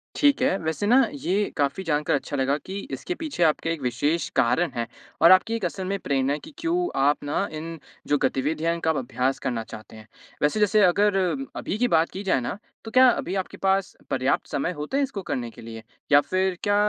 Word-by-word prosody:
ठीक 285 Hz, -3 st, +3 dB
है। 255 Hz, -7 st, +2 dB
वैसे 160 Hz, +5 st, -2 dB
ना 245 Hz, -, +6 dB, 0.2 s
ये 205 Hz, -7 st, -1 dB
काफ़ी 145 Hz, +5 st, 0 dB
जानकार 150 Hz, -4 st, +1 dB
अच्छा 145 Hz, +1 st, -4 dB
लगा 135 Hz, +1 st, +1 dB
कि 190 Hz, +6 st, -7 dB
इसके 355 Hz, -, -4 dB
पीछे 305 Hz, -, -2 dB
आपका 160 Hz, +1 st, +2 dB
एक 165 Hz, -3 st, -2 dB
विशेष 145 Hz, +6 st, 0 dB
कारण 135 Hz, +6 st, +2 dB
है 115 Hz, -1 st, -2 dB, 0.3 s
और 170 Hz, +3 st, +8 dB
आपकी 225 Hz, +5 st, +5 dB
एक 225 Hz, -, -2 dB
असल 185 Hz, +2 st, -3 dB
में 195 Hz, +2 st, -1 dB
प्रेरणा 135 Hz, -2 st, 0 dB
है 150 Hz, -, -3 dB
कि 315 Hz, -, -12 dB
क्यों 350 Hz, +1 st, 0 dB
आप 145 Hz, +2 st, +2 dB
ना 150 Hz, +7 st, -1 dB
इन 165 Hz, +1 st, -6 dB, 0.3 s
जो 145 Hz, -, +3 dB
गतिविधियाँ 155 Hz, +5 st, 0 dB
हैं -, -, 0 dB
इनका 165 Hz, -1 st, -1 dB
आप 155 Hz, -, -2 dB
अभ्यास 130 Hz, +1 st, -1 dB
करना 115 Hz, -3 st, -2 dB
चाहते 110 Hz, 0 st, -11 dB
हैं। 110 Hz, 0 st, -13 dB, 0.3 s
वैसे 150 Hz, +8 st, +2 dB
जैसे 210 Hz, 0 st, +4 dB
अगर 200 Hz, +3 st, +3 dB, 0.4 s
अभी 200 Hz, -, -3 dB
की 245 Hz, +2 st, +2 dB
बात 165 Hz, -3 st, +3 dB
की 195 Hz, +2 st, -6 dB
जाए 185 Hz, -, +2 dB
ना 120 Hz, -, -4 dB, 0.3 s
तो 225 Hz, -, -7 dB
क्या 255 Hz, +2 st, +7 dB
अभी 190 Hz, -6 st, -1 dB
आपके 190 Hz, -1 st, -4 dB
पास 195 Hz, 0 st, 0 dB
पर्याप्त 130 Hz, +1 st, 0 dB
समय 140 Hz, -, -1 dB
होते 150 Hz, -, -3 dB
हैं 285 Hz, -, +2 dB
इसको 265 Hz, -7 st, -4 dB
करने 120 Hz, -9 st, -3 dB
के -, -, -13 dB
लिए? 115 Hz, 0 st, -9 dB, 0.3 s
या 145 Hz, -, +8 dB
फ़िर 185 Hz, +2 st, -1 dB
क्या 205 Hz, 0 st, +2 dB
165 Hz, 225 wpm, -25 LUFS, 140-200 Hz, 0.4 s, और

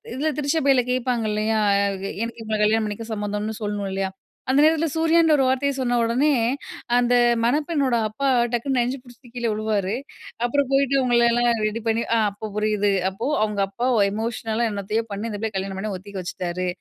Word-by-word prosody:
இதுல 305 Hz, +3 st, 0 dB
திருச்சபையில 280 Hz, -3 st, +2 dB
கேட்பாங்க 250 Hz, -2 st, 0 dB
இல்லையா? 215 Hz, +1 st, 0 dB, 0.6 s
எனக்கு 230 Hz, 0 st, -4 dB
இவுங்கள 215 Hz, -1 st, -2 dB
கல்யாணம் 220 Hz, +1 st, +2 dB
பண்ணிக்க 220 Hz, +2 st, -6 dB
சம்மந்தம்ன்னு 210 Hz, +1 st, -3 dB
சொல்லணும் 205 Hz, -1 st, -2 dB
இல்லையா? 195 Hz, 0 st, -2 dB, 0.4 s
அந்த 270 Hz, +2 st, +4 dB
நேரத்தில 320 Hz, +1 st, +3 dB
சூர்யான்ற 325 Hz, 0 st, +3 dB
ஒரு 270 Hz, -, +2 dB
வார்த்தைய 270 Hz, +2 st, +1 dB
சொன்ன 245 Hz, -2 st, 0 dB
ஒடனே, 250 Hz, +6 st, +2 dB, 0.7 s
அந்த 245 Hz, 0 st, +2 dB, 0.3 s
மணப்பெண்ணோட 285 Hz, -1 st, +1 dB
அப்பா 275 Hz, +6 st, -3 dB, 0.3 s
டக்குன்னு 255 Hz, +2 st, 0 dB
நெஞ்ச 245 Hz, +3 st, 0 dB
புடிச்சிட்டு 245 Hz, 0 st, -17 dB
கீழ 240 Hz, -1 st, -1 dB
வுழுவாரு. 210 Hz, -1 st, -1 dB, 0.5 s
அப்பறம் 275 Hz, +2 st, +1 dB
போயிட்டு 275 Hz, 0 st, +3 dB
அவுங்களல்லாம் 240 Hz, -1 st, +3 dB, 0.2 s
ரெடி 225 Hz, +2 st, -4 dB
பண்ணி 225 Hz, +1 st, +1 dB
அ -, -, +3 dB
அப்ப 210 Hz, +2 st, -7 dB
புரியுது. 210 Hz, -1 st, +1 dB, 0.2 s
அப்போ 225 Hz, +7 st, -5 dB, 0.2 s
அவுங்க 210 Hz, -2 st, -1 dB
அப்பா 240 Hz, +6 st, -3 dB
ஒ -, -, +3 dB
எமோஷனலா 225 Hz, +1 st, -2 dB
என்னத்தையோ 205 Hz, +3 st, -2 dB
பண்ணி, 210 Hz, +3 st, -4 dB
இந்த 205 Hz, -, -5 dB
பிள்ளைய 220 Hz, -2 st, -3 dB
கல்யாணம் 190 Hz, 0 st, -4 dB
பண்ண 210 Hz, 0 st, -3 dB
ஒத்துக்க 195 Hz, +1 st, -8 dB
வச்சுட்டாரு. 180 Hz, 0 st, -3 dB
230 Hz, 170 wpm, -23 LUFS, 210-260 Hz, 0.7 s, அந்த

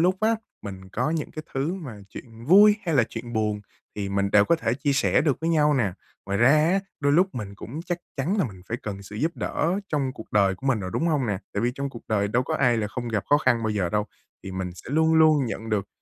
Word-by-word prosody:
lúc 180 Hz, +3 st, +3 dB
á, 225 Hz, +1 st, +3 dB, 0.3 s
mình 95 Hz, -2 st, -8 dB
có 125 Hz, +9 st, -1 dB
những 160 Hz, -2 st, -2 dB
cái 155 Hz, -, -7 dB
thứ 140 Hz, +7 st, -1 dB
mà 130 Hz, -, -8 dB
chuyện 115 Hz, 0 st, -11 dB
vui 205 Hz, -, +7 dB
hay 165 Hz, -, +1 dB
là 125 Hz, -, +5 dB
chuyện 120 Hz, +1 st, -8 dB
buồn 105 Hz, -2 st, 0 dB, 0.4 s
thì 100 Hz, -1 st, -3 dB
mình 100 Hz, 0 st, 0 dB
đều 105 Hz, 0 st, +6 dB
có 170 Hz, -, +3 dB
thể 115 Hz, -7 st, -1 dB
chia 140 Hz, +1 st, 0 dB
sẻ 135 Hz, -, +3 dB
được 145 Hz, -2 st, 0 dB
với 165 Hz, -, 0 dB
nhau 150 Hz, -2 st, +3 dB
nè. 105 Hz, -8 st, +1 dB, 0.3 s
Ngoài 100 Hz, 0 st, -1 dB
ra 120 Hz, +3 st, +6 dB
á, 160 Hz, +6 st, +4 dB, 0.2 s
đôi 145 Hz, 0 st, +2 dB
lúc 185 Hz, +2 st, +3 dB
mình 105 Hz, -4 st, -5 dB
cũng 130 Hz, +9 st, -7 dB
chắc 175 Hz, -1 st, -3 dB, 0.2 s
chắn 155 Hz, +9 st, 0 dB
là 190 Hz, -, +3 dB
mình 95 Hz, -7 st, -8 dB
phải 115 Hz, -, -2 dB
cần 100 Hz, -2 st, -5 dB
sự 100 Hz, +2 st, -10 dB
giúp 160 Hz, +9 st, -1 dB
đỡ 175 Hz, +5 st, -1 dB
trong 140 Hz, -4 st, -1 dB
cuộc 110 Hz, -, -12 dB
đời 100 Hz, -2 st, +3 dB
của 130 Hz, -, -8 dB
mình 120 Hz, -6 st, +2 dB
rồi, 90 Hz, -1 st, -4 dB
đúng 165 Hz, -, 0 dB
hông 145 Hz, -6 st, +1 dB
nè? 100 Hz, -3 st, -1 dB
Tại -, -, -1 dB
vì 120 Hz, -, +2 dB
trong 140 Hz, 0 st, -3 dB
cuộc 115 Hz, -, -10 dB
đời 100 Hz, -2 st, +1 dB
đâu 120 Hz, +4 st, +1 dB
có -, -, -3 dB
ai 125 Hz, -3 st, +3 dB
là 110 Hz, -2 st, -1 dB
không 120 Hz, +3 st, -5 dB
gặp 105 Hz, -3 st, -1 dB
khó 145 Hz, -, +6 dB
khăn 120 Hz, -5 st, +2 dB
bao 110 Hz, -, 0 dB
giờ 100 Hz, -4 st, 0 dB
đâu, 105 Hz, +3 st, 0 dB, 0.4 s
thì 95 Hz, -, -6 dB
mình 95 Hz, -1 st, -3 dB
sẽ 115 Hz, -, -11 dB
luôn 160 Hz, +2 st, +3 dB
luôn 155 Hz, -3 st, +5 dB
nhận 110 Hz, 0 st, -5 dB
được 105 Hz, -2 st, -1 dB
125 Hz, 275 wpm, -25 LUFS, 105-155 Hz, 0.4 s, vui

